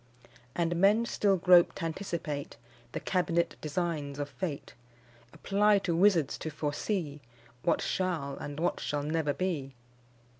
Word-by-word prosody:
And 170 0 0
men 205 +6 +4
still 200 -4 +2
grope 180 -1 +6
t' - - -4
anticipate 160 -4 -4 0.3
The - - -3
cabinet 170 -2 0
designs 155 -3 -2
of 145 0 -3
Fate; 160 -7 -5 0.6
Apply 205 +1 +3
to 180 -4 -1
wizards 175 -5 +3
to 160 - -4
foresee 150 +1 -3 0.4
What 170 - +1
shall 165 -7 -1
and 145 +1 -6
what 170 - 0
shall 145 -1 -2
never 155 0 0
be. 145 -6 -3
170 Hz, 135 wpm, -30 LUFS, 145-185 Hz, 0.6 s, grope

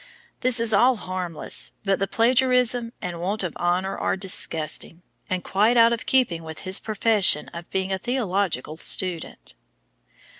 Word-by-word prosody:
This 255 -1 +3
is 230 -1 +1
all 245 +5 +4
harmless, 185 -5 -1
but 195 -1 0
the 195 - -1
plagiarism 245 +1 +2
and 175 -2 -5
want 200 +4 -3
of 175 - -4
honor 180 +2 -1
are - - -2
disgusting, 165 -3 +1 0.3
and 185 -1 -3
quite 215 +5 +1
out 230 0 +5
of 235 - -6
keeping 245 -11 +1
with 160 -1 -9
his 185 0 +1
profession 210 -7 +1
of 170 0 -10
being 190 0 -2
a 190 - -3
theological 195 - -2
student. 165 - -3
195 Hz, 150 wpm, -23 LUFS, 175-230 Hz, 0.3 s, out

